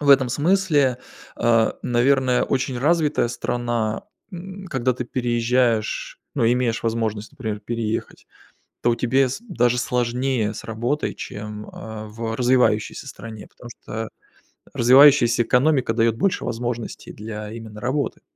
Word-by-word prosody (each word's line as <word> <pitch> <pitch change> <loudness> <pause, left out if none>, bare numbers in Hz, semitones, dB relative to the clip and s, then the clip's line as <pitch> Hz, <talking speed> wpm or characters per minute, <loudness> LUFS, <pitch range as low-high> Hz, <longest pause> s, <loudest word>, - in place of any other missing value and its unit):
в 145 -1 +3
этом 130 -2 +6
смысле, 145 -3 +2 0.4
э, 115 -1 +3
наверное, 125 +1 +2
очень 130 -1 -1
развитая 150 -3 +2
страна, 120 -2 -2 0.3
н 190 +2 -8
когда 130 -3 0
ты 125 - -4
переезжаешь, 120 -2 0
ну, - - +1
имеешь 120 -2 0
возможность, 110 -2 -2
например, 110 -5 -4
переехать, 115 0 -4 0.6
то 120 0 +3
тебе 130 +2 +2
с 135 - -5
даже 125 - +1
сложнее 125 -2 0
с - - -7
работой, 120 +7 -2
чем, 105 0 -7
э, 110 -1 -8
в 115 +1 -4
развивающейся 125 -1 +1
стране, 110 -4 -9
потому 120 - -13
что 110 -1 -6 0.7
развивающаяся 125 -1 +6
экономика 125 0 +2
дает 115 -1 +2
больше 195 0 0
возможностей 120 0 -4
для 105 0 -7
именно 110 -2 -9
работы. 135 +4 -2
120 Hz, 130 wpm, -22 LUFS, 115-130 Hz, 0.7 s, этом